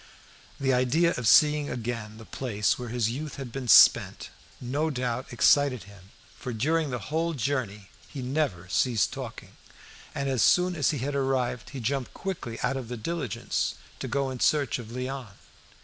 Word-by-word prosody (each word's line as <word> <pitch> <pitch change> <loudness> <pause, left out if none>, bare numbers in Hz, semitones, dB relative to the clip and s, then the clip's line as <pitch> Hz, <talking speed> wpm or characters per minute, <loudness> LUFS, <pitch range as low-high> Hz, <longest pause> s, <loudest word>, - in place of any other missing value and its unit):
The 135 -1 +1
idea 140 +7 +2
of 125 -3 -2
seeing 150 +4 +5
again 115 -2 -5
the 110 - -11
place 105 -5 -1
where 125 -1 -5
his 115 -1 0
youth 150 +5 -5
had 135 -4 -7
been 130 0 -5
spent - - +6 0.3
no 145 +6 -1
doubt 125 -2 -3
excited 130 -1 +3
him, 95 -1 -16 0.3
for 125 - -5
during 155 +7 0
the 125 +2 -6
whole 165 +1 0
journey 115 -6 -3 0.2
he 135 -3 -7
never 125 - -1
ceased 115 +3 +1
talking, - - -8 0.6
and 140 0 -2
as 130 -4 0
soon 180 0 +4
as 150 -4 +2
he 150 - -1
had 140 +3 -3
arrived, 130 -3 -1
he 140 - -7
jumped 130 +2 -2
quickly 160 -12 -5
out 130 +2 0
of 130 -3 -6
the 125 +1 -5
diligence 140 - -2 0.2
to - - -4
go 135 +1 -1
in 130 - -6
search 140 -5 +2
of 115 - -8
Léon. 125 -2 -5
130 Hz, 175 wpm, -27 LUFS, 115-145 Hz, 0.6 s, spent